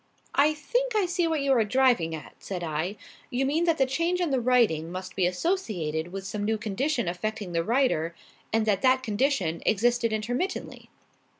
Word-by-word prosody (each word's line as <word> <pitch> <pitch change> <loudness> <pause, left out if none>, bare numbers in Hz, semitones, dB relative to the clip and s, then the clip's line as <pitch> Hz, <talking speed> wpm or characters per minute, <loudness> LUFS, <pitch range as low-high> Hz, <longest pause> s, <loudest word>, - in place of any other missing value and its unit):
"I 300 +2 +4
think 485 - -1
I 415 -3 +3
see 350 -1 0
what 320 -3 0
you 275 0 +1
are 235 -4 +4
driving 225 -8 +2
at," 150 - -10
said 180 -3 -5
I. 160 +5 -2 0.3
"You 255 +2 0
mean 310 +5 +1
that 330 -2 +2
the 270 - +4
change 335 +7 0
in 345 -5 0
the 260 -2 +1
writing 225 -10 +2
must 185 0 -6
be 185 -2 +2
associated 180 - -2
with 195 0 -6
some 205 +1 -3
new 220 +1 +1
condition 235 - -1
affecting 205 +2 -3
the 165 -1 0
writer, 220 - +1 0.4
and 225 0 +2
that 205 -3 +1
that 260 0 +3
condition 210 - 0
existed 235 +2 +2
intermittently?" 245 - -3
230 Hz, 185 wpm, -27 LUFS, 185-275 Hz, 0.4 s, I